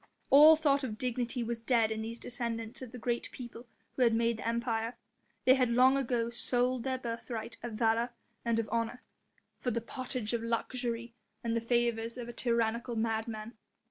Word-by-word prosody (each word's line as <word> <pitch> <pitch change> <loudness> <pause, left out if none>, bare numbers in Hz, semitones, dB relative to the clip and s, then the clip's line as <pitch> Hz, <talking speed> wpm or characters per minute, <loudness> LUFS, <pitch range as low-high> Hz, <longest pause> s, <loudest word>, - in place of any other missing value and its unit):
All 300 +3 +10
thought 285 -3 +2
of 220 -5 -3
dignity 245 0 -1
was 230 0 -3
dead 230 -2 +3
in 220 0 -2
these 230 +1 -5
descendants 235 0 -3
of 255 -3 -7
the 250 - -8
great 240 0 -2
people 240 -1 -9 0.3
who - - -2
had 230 -2 +5
made 230 0 +2
the - - -5
Empire; 230 0 -1 0.5
they 260 - +8
had 255 -2 +3
long 255 +3 +5
ago 240 -3 0
sold 245 +1 +1
their 260 -1 -1
birthright 230 -1 -5
of 240 -1 -5
valour 230 +2 +2 0.3
and 235 -1 +1
of 230 -1 0
honour 230 +2 -2 0.6
for 250 - -1
the 235 -1 0
pottage 245 -1 -4
of 235 - 0
luxury 235 0 -2 0.3
and 230 -1 0
the 230 - +1
favours 235 0 0
of 240 -1 -5
a 240 - -7
tyrannical 235 0 0
madman. 220 0 -2
235 Hz, 180 wpm, -32 LUFS, 230-250 Hz, 0.6 s, All